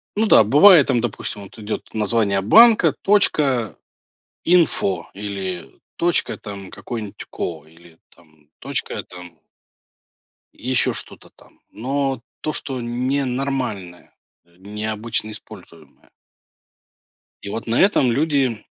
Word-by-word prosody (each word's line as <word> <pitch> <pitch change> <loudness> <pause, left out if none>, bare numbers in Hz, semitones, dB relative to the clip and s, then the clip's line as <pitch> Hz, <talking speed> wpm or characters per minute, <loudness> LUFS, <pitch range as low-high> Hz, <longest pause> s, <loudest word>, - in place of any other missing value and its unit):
Ну 215 +2 +1
да, 160 - +7
бывает 150 - +7
там, 125 -3 +2
допустим, 110 -3 -4
вот 100 - -14
идет 110 0 -6
название 105 -2 +1
банка, 225 - +6 1.5
.info 155 - +2
или 95 -3 -6 0.2
точка, 175 0 0
там 100 -3 -9
какое-нибудь, 105 +1 -7
ко 80 -4 -5
или 80 +1 -20
там 80 -3 -25
точка, - - -4
там 90 -3 -13 1.1
еще 125 +1 0
что-то - - -5
там. - - -24
Но 135 +2 -2 0.2
то, 155 - -2
что 130 -4 -2
не 125 +4 -1
нормальное, 125 -9 -4 0.3
э, 85 0 -29
необычно 110 +3 -4
используемое. 90 -8 -13 1.3
И 100 - -7
вот 115 - -5
на 115 +1 +1
этом 165 -11 +3
люди 135 -3 0
110 Hz, 110 wpm, -20 LUFS, 95-135 Hz, 1.5 s, да